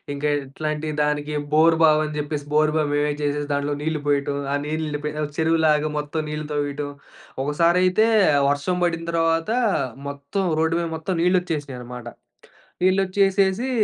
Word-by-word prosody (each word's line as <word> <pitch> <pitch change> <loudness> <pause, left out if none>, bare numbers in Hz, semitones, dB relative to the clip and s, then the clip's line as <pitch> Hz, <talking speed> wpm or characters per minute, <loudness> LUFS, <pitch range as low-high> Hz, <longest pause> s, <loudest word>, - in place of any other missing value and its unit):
ఇంకా 150 +1 -1 0.2
ఇట్లాంటి 150 +3 -4 0.2
దానికి 150 0 -1 0.2
బోరు‌బావి 160 -1 +5
అని‌చెప్పేసి 150 -1 -4
బోరు‌బావి 155 0 +2
మేమే 145 0 +1
చేసేసి 145 0 -1
దాంట్లో 145 +1 -1
నీళ్లు 160 0 -1
పోయటం. 140 -1 +1 0.2
ఆ - - +2
నీళ్ళు 155 +1 -2
నిండిపోయి 150 0 -4 0.3
చెరువులాగా 160 -2 +2
మొత్తం 150 +2 -3
నీళ్లు 150 0 -4
తవ్వేయటం. 145 0 -2 0.5
ఒకసారైతే 175 +7 +3 0.4
వర్షం 145 +5 0
పడి‌నతర్వాత 165 -1 +1 0.7
మొత్తం 140 +7 -4 0.2
రోడ్డు 160 +1 +1
మీద 170 - -1
మొత్తం 160 +4 -3
నీళ్లొచ్చేసినియన్నమాట. 145 -9 -2 0.8
నీళ్లొ‌చ్చేసేసి, 195 +4 +2
155 Hz, 115 wpm, -23 LUFS, 145-165 Hz, 0.8 s, బోరు‌బావి